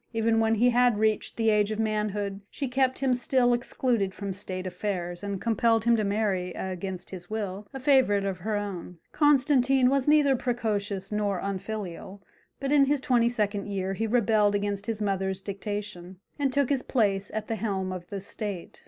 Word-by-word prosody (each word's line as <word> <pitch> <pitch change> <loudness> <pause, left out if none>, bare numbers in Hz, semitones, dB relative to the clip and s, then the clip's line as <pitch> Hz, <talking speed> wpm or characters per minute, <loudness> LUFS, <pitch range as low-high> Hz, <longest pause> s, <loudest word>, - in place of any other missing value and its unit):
Even 225 0 +2
when 225 0 +3
he 245 +3 +4
had 245 -2 +3
reached 215 0 0
the 225 -1 +3
age 210 -1 +2
of 215 - -3
manhood 210 -2 -1
she 275 - -4
kept 260 0 +1
him 265 -2 +1
still 245 0 +2
excluded 240 -4 0
from 200 -2 -4
state 185 -1 -5
affairs, 180 -2 -3
and 200 -1 -3
compelled 225 0 +2
him 235 0 +5
to 220 - 0
marry, 200 -3 0
against 185 -1 -5
his 175 -2 -8
will, 205 -2 -4
a 270 - -6
favourite 255 -7 +3
of 190 -2 -3
her 215 +4 -2
own. 190 -4 -5
Constantine 270 -3 +4
was 275 -1 +1
neither 295 -2 +5
precocious 210 -6 -2
nor 205 -2 0
unfilial, 195 -1 -5 0.4
but 275 0 -2
in 285 -2 +6
his 285 +1 +1
twenty 240 -3 +2
second 210 -4 -1
year 195 -1 -2
he 225 +3 -2
rebelled 215 -3 +3
against 205 0 -2
his 220 -2 -2
mother's 190 -1 -1
dictation, 200 -2 -5 0.2
and 275 -2 +1
took 280 -1 +1
his 275 -3 +1
place 200 -7 0
at 215 -1 -2
the 225 - -2
helm 195 -4 -2
of 180 -1 -7
the 200 0 -5
state. 200 -3 -6
210 Hz, 185 wpm, -27 LUFS, 195-240 Hz, 0.4 s, in